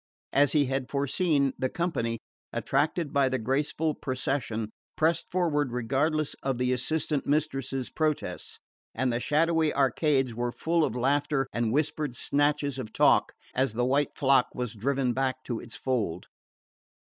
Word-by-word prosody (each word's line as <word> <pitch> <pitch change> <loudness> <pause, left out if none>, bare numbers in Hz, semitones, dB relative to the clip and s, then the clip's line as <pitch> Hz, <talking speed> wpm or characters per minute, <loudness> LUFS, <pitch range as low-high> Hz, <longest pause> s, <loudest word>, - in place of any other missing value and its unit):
As 145 +1 +4
he 150 -2 +4
had 135 0 -2
foreseen, 140 0 +1
the 130 - 0
company, 125 -10 -1 0.3
attracted 160 0 0
by 140 -2 +3
the 130 - 0
graceful 145 +6 0
procession, 130 -5 -2 0.3
pressed 160 +2 +1
forward 150 -7 +1
regardless 140 +6 0
of 135 -2 -1
the 125 +1 +1
assistant 145 +3 -1
mistresses' 135 -3 -1
protests, 155 -2 -2 0.4
and 125 0 0
the 120 - 0
shadowy 160 +3 +2
arcades 135 -1 +2
were 120 +1 -2
full 165 +5 +1
of 120 - -1
laughter 135 +2 +1
and 115 -1 0
whispered 145 -1 -1
snatches 145 0 0
of 110 -4 -6
talk - - +4 0.2
as 130 -3 +1
the 120 +2 0
white 140 +3 +1
flock 135 -2 +4
was 125 -2 -3
driven 130 +3 0
back 130 0 -1
to 120 -3 -3
its 115 - -7
fold. 110 -10 -2
135 Hz, 145 wpm, -28 LUFS, 125-150 Hz, 0.4 s, As